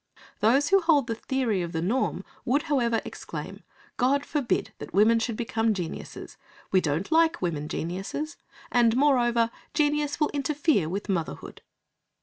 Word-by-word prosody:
Those 270 Hz, +7 st, +3 dB
who 390 Hz, 0 st, +5 dB
hold 315 Hz, -6 st, +3 dB
the 230 Hz, -, -2 dB
theory 225 Hz, -4 st, -1 dB
of 170 Hz, 0 st, -4 dB
the 160 Hz, -, -1 dB
norm 240 Hz, +9 st, -1 dB, 0.2 s
would, 280 Hz, +3 st, +1 dB
however, 240 Hz, -7 st, +1 dB
exclaim -, -, -7 dB, 0.4 s
"God 275 Hz, +3 st, +2 dB
forbid 285 Hz, -6 st, -1 dB
that -, -, -8 dB
women 220 Hz, +3 st, +5 dB
should 225 Hz, -1 st, -2 dB
become 225 Hz, -2 st, 0 dB
geniuses! 175 Hz, -4 st, -7 dB, 0.3 s
We 185 Hz, -, +4 dB
don't 160 Hz, -, -2 dB
like 325 Hz, 0 st, +4 dB
women 155 Hz, -5 st, -2 dB
geniuses, 195 Hz, -, -4 dB, 0.4 s
and, 240 Hz, -1 st, +4 dB
moreover, 240 Hz, -5 st, +3 dB, 0.2 s
genius 295 Hz, -1 st, +1 dB
will 300 Hz, -, +2 dB
interfere 285 Hz, -, +1 dB
with 195 Hz, +4 st, -4 dB
motherhood." 175 Hz, -6 st, -4 dB
235 Hz, 145 wpm, -26 LUFS, 200-290 Hz, 0.4 s, who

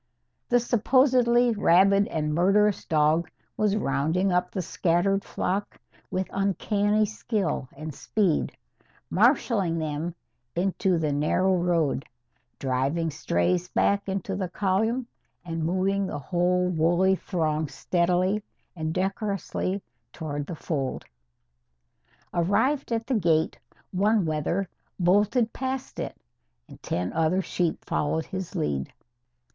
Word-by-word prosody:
The 245 Hz, -, +5 dB
supposedly 245 Hz, 0 st, +3 dB
rabid 200 Hz, 0 st, +4 dB
and 150 Hz, -1 st, -2 dB
murderous 195 Hz, +5 st, +3 dB
dog 155 Hz, +2 st, +2 dB, 0.3 s
was 210 Hz, -1 st, +1 dB
rounding 165 Hz, +4 st, +1 dB
up 180 Hz, 0 st, +1 dB
the 185 Hz, -, -3 dB
scattered 185 Hz, +4 st, +1 dB
flock 195 Hz, +3 st, -3 dB, 0.3 s
with 185 Hz, 0 st, -2 dB
uncanny 205 Hz, +2 st, +1 dB
skill 205 Hz, -, -2 dB
and 155 Hz, +1 st, -6 dB
speed, 190 Hz, +1 st, 0 dB, 0.5 s
marshalling 205 Hz, -, +3 dB
them 160 Hz, +2 st, -3 dB, 0.4 s
into 185 Hz, 0 st, +1 dB
the 155 Hz, -2 st, 0 dB
narrow 185 Hz, +6 st, +2 dB
road, 170 Hz, -6 st, +1 dB, 0.5 s
driving 140 Hz, +6 st, 0 dB
strays 150 Hz, -, 0 dB
back 200 Hz, 0 st, +1 dB
into 195 Hz, 0 st, -2 dB
the 190 Hz, -2 st, -3 dB
column 215 Hz, +7 st, 0 dB, 0.4 s
and 165 Hz, -2 st, -3 dB
moving 190 Hz, +3 st, +1 dB
the -, -, -4 dB
whole 180 Hz, +4 st, +1 dB
woolly 175 Hz, +3 st, +3 dB
throng 160 Hz, -5 st, -1 dB
steadily 180 Hz, +7 st, +1 dB, 0.3 s
and 160 Hz, -1 st, -3 dB
decorously 195 Hz, 0 st, -2 dB, 0.3 s
toward 145 Hz, -3 st, -4 dB
the 170 Hz, -, -5 dB
fold. 140 Hz, -4 st, -3 dB, 1.3 s
Arrived 230 Hz, -, +1 dB
at 225 Hz, 0 st, -1 dB
the 265 Hz, -, -1 dB
gate, 165 Hz, -2 st, +1 dB, 0.3 s
one 205 Hz, +1 st, +2 dB
wether 160 Hz, +5 st, -1 dB, 0.3 s
bolted 205 Hz, +6 st, +3 dB
past 265 Hz, 0 st, -4 dB
it, -, -, -4 dB, 0.5 s
and -, -, -14 dB
ten 90 Hz, +1 st, -2 dB
other 165 Hz, +4 st, +1 dB
sheep 175 Hz, -2 st, -2 dB
followed 160 Hz, +2 st, -1 dB
his 190 Hz, -2 st, -6 dB
lead. 70 Hz, -2 st, -1 dB
180 Hz, 115 wpm, -26 LUFS, 160-200 Hz, 1.3 s, The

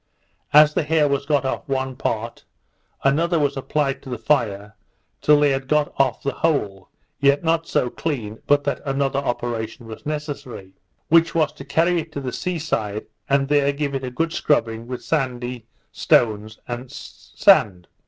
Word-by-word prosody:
As 150 Hz, +1 st, +7 dB
the -, -, +1 dB
hair 155 Hz, -1 st, +2 dB
was 140 Hz, 0 st, -1 dB
got 145 Hz, -2 st, +1 dB
off 130 Hz, -, -3 dB
one 130 Hz, -1 st, -1 dB
part, 115 Hz, -2 st, -3 dB, 0.6 s
another 165 Hz, +5 st, +2 dB
was 145 Hz, -2 st, +1 dB
applied 135 Hz, 0 st, -1 dB
to 135 Hz, -, -11 dB
the 125 Hz, -, -3 dB
fire 110 Hz, -5 st, -1 dB, 0.5 s
till 150 Hz, 0 st, +5 dB
they 145 Hz, -1 st, +4 dB
had 135 Hz, 0 st, -2 dB
got 150 Hz, 0 st, +1 dB
off 135 Hz, -3 st, +1 dB
the 140 Hz, -, 0 dB
whole, 105 Hz, -, -1 dB, 0.3 s
yet 140 Hz, +1 st, +3 dB
not 165 Hz, 0 st, +1 dB
so -, -, +1 dB
clean 115 Hz, -9 st, -4 dB
but 145 Hz, 0 st, +4 dB
that 145 Hz, -, -2 dB
another 135 Hz, -1 st, 0 dB
operation 120 Hz, -3 st, -3 dB
was 110 Hz, -1 st, -10 dB
necessary; 145 Hz, -10 st, -6 dB, 0.4 s
which 165 Hz, +1 st, +4 dB
was 155 Hz, -3 st, +2 dB
to -, -, -10 dB
carry 170 Hz, +4 st, +2 dB
it 160 Hz, 0 st, -7 dB
to -, -, -3 dB
the 130 Hz, -2 st, -5 dB
sea 180 Hz, -2 st, -2 dB
side, 110 Hz, -9 st, -2 dB, 0.2 s
and 135 Hz, 0 st, +2 dB
there 145 Hz, -1 st, +3 dB
give 140 Hz, 0 st, -3 dB
it 135 Hz, -1 st, -3 dB
a 130 Hz, -, -3 dB
good 165 Hz, +6 st, -2 dB
scrubbing 115 Hz, -5 st, 0 dB
with 125 Hz, 0 st, -6 dB
sandy 125 Hz, -5 st, -2 dB, 0.2 s
stones, 110 Hz, -, +1 dB
and 120 Hz, +1 st, -6 dB
sand. 90 Hz, -4 st, +1 dB
135 Hz, 175 wpm, -22 LUFS, 120-150 Hz, 0.6 s, As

